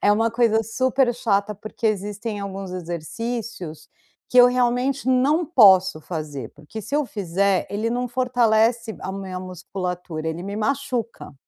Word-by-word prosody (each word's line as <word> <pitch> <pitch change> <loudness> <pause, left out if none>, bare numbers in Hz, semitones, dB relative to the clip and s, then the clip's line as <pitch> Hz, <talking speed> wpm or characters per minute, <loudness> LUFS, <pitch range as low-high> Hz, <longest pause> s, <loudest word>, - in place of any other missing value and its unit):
é 205 - +5
uma 225 +2 +3
coisa 230 -1 +3
super 255 +2 +1
chata, 210 -3 0
porque 215 +2 -5
existem 210 +1 -2
alguns 195 -1 -6
exercícios 180 0 -5 0.4
que 250 - +3
eu 245 - +10
realmente 250 +2 +1
não 275 +6 +3
posso 190 - +6
fazer, 150 -7 -6
porque 150 +9 -9
se 280 - -2
eu 300 - +1
fizer, 195 -3 0
ele 215 +3 -1
não 245 +1 -1
fortalece 235 -2 +2
a 190 - -4
minha 190 -2 -5
musculatura 180 -2 -5
ele 165 +2 -4
me 200 +2 -5
machuca 245 - -2
215 Hz, 145 wpm, -23 LUFS, 185-245 Hz, 0.4 s, eu